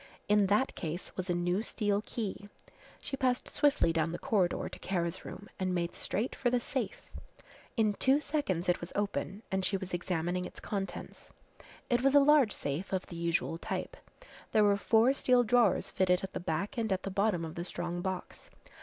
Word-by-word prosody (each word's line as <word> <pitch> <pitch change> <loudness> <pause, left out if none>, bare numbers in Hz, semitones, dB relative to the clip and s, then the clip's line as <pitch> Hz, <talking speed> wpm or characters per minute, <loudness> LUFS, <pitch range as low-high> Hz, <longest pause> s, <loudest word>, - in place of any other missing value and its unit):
In 210 -1 +4
that 210 +7 +2
case 170 +2 -5
was 185 0 -4
a 175 - +2
new 175 +3 +1
steel 205 -3 0
key. 205 -3 -5 0.5
She - - -4
passed 255 -2 0
swiftly 290 - +2
down 165 0 +1
the 175 - -3
corridor 200 -9 +1
to - - -9
Kara's 170 -3 -2
room 205 - -8
and 185 -1 0
made 170 -1 -1
straight 220 +6 -2
for 245 - +1
the 245 0 +2
safe. 240 -4 -3 0.7
In 215 -2 +3
two 265 +7 +3
seconds 285 - -1
it 180 - +2
was 170 - -6
open 205 0 -2
and 190 0 0
she 195 - +1
was 190 -1 -7
examining 175 0 -1
its - - -9
contents. 195 -3 -5 0.5
It 240 -1 +2
was 275 +2 +3
a - - +10
large 285 -5 +5
safe 145 +7 -4
of 190 -1 -1
the 170 - -9
usual 170 -1 -1
type. - - -4 0.6
There 215 - +5
were 205 -1 +5
four 225 +5 +4
steel 250 -2 +4
drawers 235 -3 +3
fitted 180 -1 +2
at 190 - -5
the - - -3
back 190 - -2
and 220 -2 -1
at 190 -1 0
the 195 - -3
bottom 195 -3 +1
of 160 - -7
the 170 - -4
strong 175 0 -4
box. 190 -1 -5
195 Hz, 195 wpm, -31 LUFS, 175-230 Hz, 0.7 s, a